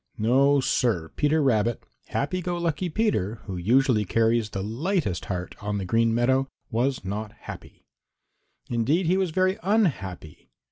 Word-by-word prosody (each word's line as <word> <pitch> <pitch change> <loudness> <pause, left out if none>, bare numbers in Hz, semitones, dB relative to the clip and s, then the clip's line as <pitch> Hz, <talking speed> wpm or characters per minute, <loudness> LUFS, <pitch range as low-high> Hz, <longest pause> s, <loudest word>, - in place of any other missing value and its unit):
No, 135 +6 +4
Sir, 110 -10 0
Peter 150 +1 +2
Rabbit, 115 -3 +1 0.2
happy 185 +6 -2
go 175 0 -2
lucky 170 +1 -1
Peter, 155 - 0
who 95 - -5
usually 115 +5 +3
carries 115 +2 +1
the 95 -1 -4
lightest 120 - -1
heart 90 -2 -4
on 105 0 -2
the 95 - -3
Green 115 +4 +2
Meadows, 130 +3 +2 0.2
was 125 +1 0
not 105 +2 -4
happy. - - -10 0.8
Indeed, 130 +10 +1
he 175 +3 +3
was 190 -2 +1
very 185 +4 +1
unhappy. 130 - -1
120 Hz, 145 wpm, -25 LUFS, 105-160 Hz, 0.8 s, No